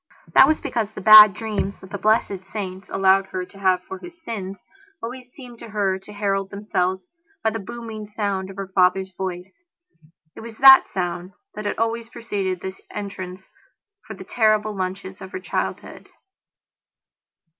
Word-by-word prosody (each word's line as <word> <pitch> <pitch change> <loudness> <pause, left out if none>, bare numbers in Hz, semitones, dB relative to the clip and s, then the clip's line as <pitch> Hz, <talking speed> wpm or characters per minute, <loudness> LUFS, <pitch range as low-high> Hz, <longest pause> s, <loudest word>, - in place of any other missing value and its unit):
That - - +8
was 310 - +2
because 220 -3 -2
the 215 - -9
bad 215 +1 +10
dreams 210 -3 -3
that 190 - -14
the 200 - -5
blessed 205 -2 +1
saints 190 -2 -6
allowed 195 0 +3
her 185 -1 -4
to 195 - -17
have 185 -2 +2
for 190 - -8
her - - -9
sins 225 - -7 0.4
always 250 +2 -8
seemed 245 -4 -13
to 230 - -10
her 200 -3 0
to 195 - -13
herald 195 -1 -1
themselves 190 - -2 0.4
by 220 - +2
the 225 - -4
booming 220 0 -8
sound 200 -3 -3
of 195 - -10
her 195 0 -5
father's 190 0 +2
voice. 185 - -6 0.7
It - - -10
was 225 -1 -10
that 270 0 +9
sound 180 0 -4 0.2
that 210 - -7
had 205 - -2
always 230 0 -2
preceded 200 -7 -4
his 190 0 -7
entrance 190 -2 -7 0.6
for - - -7
the - - -10
terrible 215 -2 +1
lunches 190 0 -5
of 190 - -10
her - - -4
childhood... 185 - -5
200 Hz, 165 wpm, -22 LUFS, 190-220 Hz, 0.7 s, bad